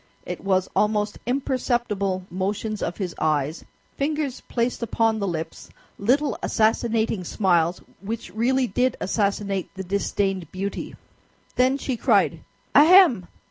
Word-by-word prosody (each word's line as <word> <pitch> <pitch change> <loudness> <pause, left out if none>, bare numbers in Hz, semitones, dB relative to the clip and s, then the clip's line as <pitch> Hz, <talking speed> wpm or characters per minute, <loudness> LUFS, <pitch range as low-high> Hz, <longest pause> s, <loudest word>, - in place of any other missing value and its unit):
It - - -6
was 190 -1 +1
almost 210 0 +1
imperceptible 240 -7 -1
motions 205 +3 -2
of 170 - -3
his 185 -4 -3
eyes, 155 0 0 0.3
fingers 290 -2 -2
placed 240 +1 -1
upon 225 -1 +1
the 200 - -1
lips, 165 -2 -5 0.3
little 270 +8 +1
assassinating 220 -2 +1
smiles, 175 -2 +1 0.2
which 210 0 -6
really 255 +4 +2
did 250 +4 0
assassinate 200 -1 -1
the 190 - -5
disdained 195 -2 -1
beauty. 195 +2 -4 0.6
Then 255 +2 +3
she 265 -3 -3
cried, - - +2 0.3
"Ahem!" 310 - +7
210 Hz, 120 wpm, -24 LUFS, 190-245 Hz, 0.6 s, Ahem